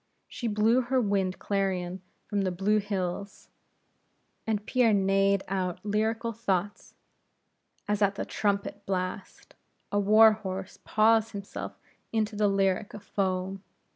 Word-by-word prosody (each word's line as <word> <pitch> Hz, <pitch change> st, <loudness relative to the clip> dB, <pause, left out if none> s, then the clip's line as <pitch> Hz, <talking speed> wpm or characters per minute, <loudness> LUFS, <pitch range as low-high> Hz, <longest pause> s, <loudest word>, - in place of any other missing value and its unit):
She 240 Hz, -, -5 dB
blew 220 Hz, +4 st, +3 dB
her 255 Hz, +1 st, +1 dB
wind 200 Hz, -4 st, 0 dB
clarion 190 Hz, -2 st, -2 dB, 0.2 s
from 205 Hz, -2 st, -1 dB
the 190 Hz, -, +1 dB
blue 195 Hz, +4 st, +1 dB
hills, 200 Hz, -1 st, -4 dB, 1.0 s
and 210 Hz, -2 st, -1 dB
Pierre 245 Hz, -4 st, +3 dB
neighed 195 Hz, 0 st, +2 dB
out 185 Hz, -2 st, -2 dB
lyrical 220 Hz, +2 st, 0 dB
thoughts, 205 Hz, -2 st, -2 dB, 0.9 s
as 210 Hz, 0 st, 0 dB
at 200 Hz, -1 st, +3 dB
the -, -, -3 dB
trumpet 200 Hz, 0 st, -1 dB
blast, 185 Hz, 0 st, -4 dB, 0.4 s
a 205 Hz, -, +2 dB
war 215 Hz, +2 st, +7 dB
horse 190 Hz, -3 st, -5 dB
paws 225 Hz, +1 st, +3 dB
himself 200 Hz, -1 st, -6 dB, 0.3 s
into 220 Hz, -1 st, 0 dB
a -, -, +5 dB
lyric 195 Hz, 0 st, +1 dB
of 210 Hz, -, -10 dB
foam. 190 Hz, -1 st, -2 dB
200 Hz, 130 wpm, -28 LUFS, 190-215 Hz, 1.0 s, war